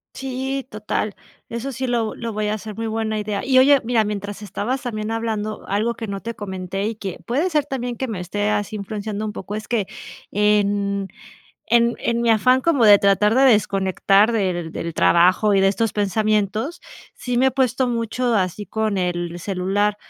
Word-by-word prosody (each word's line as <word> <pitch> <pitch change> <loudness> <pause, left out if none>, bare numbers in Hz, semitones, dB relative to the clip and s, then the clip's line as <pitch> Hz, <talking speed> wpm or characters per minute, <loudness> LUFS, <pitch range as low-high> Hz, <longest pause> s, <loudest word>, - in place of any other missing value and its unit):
Sí, 265 0 -3
total. 210 0 -2 0.4
Eso 235 +4 -4
sí 260 +2 -3
lo 235 -3 -1
lo 230 -1 -5
voy 215 0 -2
a 210 - 0
hacer, 215 0 -6
muy 225 +2 -4
buena 220 -1 -2
idea. 210 -1 -3
Y 260 -1 +4
oye, 275 +1 +6
mira, 225 -2 +2
mientras 205 0 -5
estabas 230 +5 -3
también 215 -3 -4
hablando, 220 -2 -3
algo 215 +4 0
que 225 -1 -6
no 195 -1 -5
te 230 - -5
comenté 195 -1 -4
y 225 - -3
que 195 -3 -6
puede 290 +10 +1
ser 300 -4 +1
también 245 -4 -4
que 265 - -2
me 210 -6 -4
esté 205 +4 -2
así 210 0 -1
influenciando 210 +1 -4
un 210 - -4
poco, 200 +1 -6
es 215 0 -6
que 220 -5 0 0.4
en 200 -1 +1 0.6
en 235 +1 +3
en 235 0 -1
mi 235 - +1
afán 255 +4 +4
como 280 -6 +2
de 205 -1 +8
tratar 200 +2 +3
de 265 +2 +5
desconectar 200 -2 +3
del 180 -6 -1
del 170 +1 -5
trabajo 185 +6 +4
y 195 - +4
de 195 - +5
estos 220 +2 0
pensamientos, 215 - 0 0.3
sí 245 -1 -2
me 260 - +4
he - - +4
puesto 260 -1 +1
mucho 235 +1 -1
así 195 0 -1
con 220 -2 -1
el 175 -1 -2
celular, 195 +3 0
215 Hz, 190 wpm, -21 LUFS, 200-235 Hz, 0.6 s, de